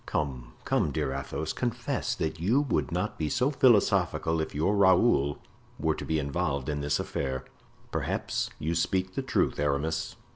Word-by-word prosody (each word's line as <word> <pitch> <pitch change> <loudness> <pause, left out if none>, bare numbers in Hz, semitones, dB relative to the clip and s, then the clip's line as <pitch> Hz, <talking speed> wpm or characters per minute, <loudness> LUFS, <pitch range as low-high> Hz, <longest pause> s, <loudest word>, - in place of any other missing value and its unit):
"Come, 65 -5 -3
come, - - +2
dear 70 -1 -1
Athos, 70 +3 -3
confess 120 -2 -2
that 80 0 -2
you 105 - +3
would 145 - -1
not 90 +5 -2
be 75 -2 0
so 130 - +1
philosophical 105 - +3
if 80 - -5
your 80 +8 +2
Raoul 95 - +4 0.4
were - - +1
to - - -6
be 80 - 0
involved 70 -2 -1
in 75 -1 -2
this 70 0 0
affair." 65 -1 -3 0.5
"Perhaps - - -1
you 80 +3 -2
speak 95 +2 0
the - - -1
truth, - - 0
Aramis." 75 +2 -1
80 Hz, 160 wpm, -28 LUFS, 70-95 Hz, 0.5 s, Raoul